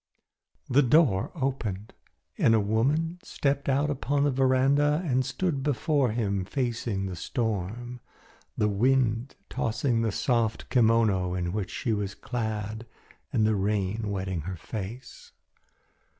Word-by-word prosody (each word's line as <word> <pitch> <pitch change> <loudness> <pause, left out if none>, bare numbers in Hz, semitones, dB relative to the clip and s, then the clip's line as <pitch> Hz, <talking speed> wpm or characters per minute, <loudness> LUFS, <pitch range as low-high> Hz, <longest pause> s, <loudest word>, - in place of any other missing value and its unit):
The 135 +3 +4
door 130 - +3
opened 120 - -3 0.4
and 115 - +4
a - - +4
woman 140 - +1
stepped 140 0 -1
out 140 +2 +2
upon 140 0 0
the 145 - +3
veranda 135 +4 +3
and 130 -4 +2
stood 140 +3 -1
before 140 0 +1
him 100 -4 -1
facing 115 -2 -2
the 95 -2 -4
storm, 115 - -3 0.6
the 105 - +2
wind 120 +3 +1
tossing 115 +1 0
the 115 -1 +1
soft 115 0 0
kimono 110 -6 +3
in 90 -1 -2
which 105 -3 -2
she 115 - -2
was 100 -1 -2
clad 110 -1 -4 0.4
and 110 - +2
the 110 - +3
rain 105 +1 -1
wetting 95 -3 -2
her 90 +3 -5
face. 110 +7 -8
115 Hz, 130 wpm, -27 LUFS, 105-135 Hz, 0.6 s, The